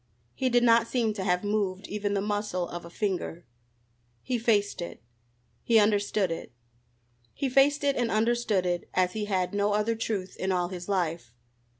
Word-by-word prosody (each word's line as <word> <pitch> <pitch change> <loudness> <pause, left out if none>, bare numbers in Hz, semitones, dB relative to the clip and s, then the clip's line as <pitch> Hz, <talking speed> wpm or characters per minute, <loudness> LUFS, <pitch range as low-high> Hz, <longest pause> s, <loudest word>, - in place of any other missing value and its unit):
He 260 - 0
did 245 0 +3
not 230 -1 +5
seem 230 -4 0
to 200 -2 -4
have 180 -1 +1
moved 205 -2 -1
even 205 0 -2
the 200 - +1
muscle 205 -3 -2
of 175 0 -7
a - - -9
finger. 180 -3 -3 0.8
He 245 -2 -1
faced 210 -5 +1
it. 170 - -7 0.6
He 230 - +3
understood 205 -3 +2
it. 165 - -5 0.8
He 275 - -1
faced 275 +3 +4
it 280 -1 +2
and 240 -2 0
understood 225 -3 +1
it 175 -1 -2
as 180 -1 +2
he 215 -1 -2
had 190 -2 -1
no 205 0 +1
other 210 +2 +1
truth 215 -4 -3
in 190 - -1
all 180 -1 0
his 180 0 -7
life. 165 - -2
205 Hz, 180 wpm, -28 LUFS, 185-225 Hz, 0.8 s, not